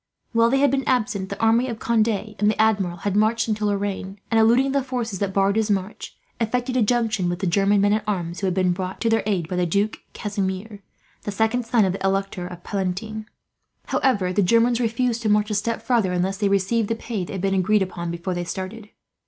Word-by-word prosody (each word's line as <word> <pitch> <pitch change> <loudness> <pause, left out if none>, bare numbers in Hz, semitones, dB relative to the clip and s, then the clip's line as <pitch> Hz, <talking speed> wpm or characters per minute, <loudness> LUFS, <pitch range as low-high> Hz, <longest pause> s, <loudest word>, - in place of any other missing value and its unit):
While 230 0 +4
they 270 - +2
had 285 -2 +4
been 270 0 0
absent, 210 -6 0
the 200 - -6
army 230 +3 +3
of 230 -3 -4
Conde 225 -1 +2
and 210 -1 -1
the 215 - -1
Admiral 200 -5 +2
had 200 -1 0
marched 220 +2 +2
into 215 -1 0
Lorraine 200 -1 -2
and, 225 - +4
eluding 240 +5 +4
the 280 0 +1
forces 240 -7 -3
that 200 -1 -1
barred 195 +1 +2
his 220 -1 +1
march, 195 0 -3 0.2
effected 245 +2 -1
a 255 - +3
junction 220 -5 +1
with 175 - -2
the 190 - -3
German 195 +3 +3
men 205 +1 +3
at 215 - 0
arms 175 -4 -2
who 195 - -1
had 185 - 0
been 185 -1 +2
brought 185 +1 -4
to 230 - +1
their 225 -1 +3
aid 185 -6 0
by 180 - -3
the 180 -1 +1
Duke 200 +5 0
Casimir, 200 0 -4 0.4
the 205 - -4
second 225 +3 0
son 230 -3 +3
of 185 - 0
the 195 - -6
Elector 195 -2 -1 0.2
Palatine. 205 +3 -3 0.6
However, 200 -9 +1
the 205 - +2
Germans 230 +5 +3
refused 235 0 0
to 220 - 0
march 210 +1 +2
a - - 0
step 225 +3 -1
farther, 230 -7 +1
unless 185 +2 0
they 205 -1 +1
received 200 +3 +1
the 230 - -1
pay 225 -4 -4
that 175 - -7
had 190 - -4
been 195 0 +1
agreed 195 +2 +3
upon 175 -2 -5
before 170 +2 -3
they 175 0 -2
started. 195 +5 -6
210 Hz, 225 wpm, -23 LUFS, 190-225 Hz, 0.6 s, While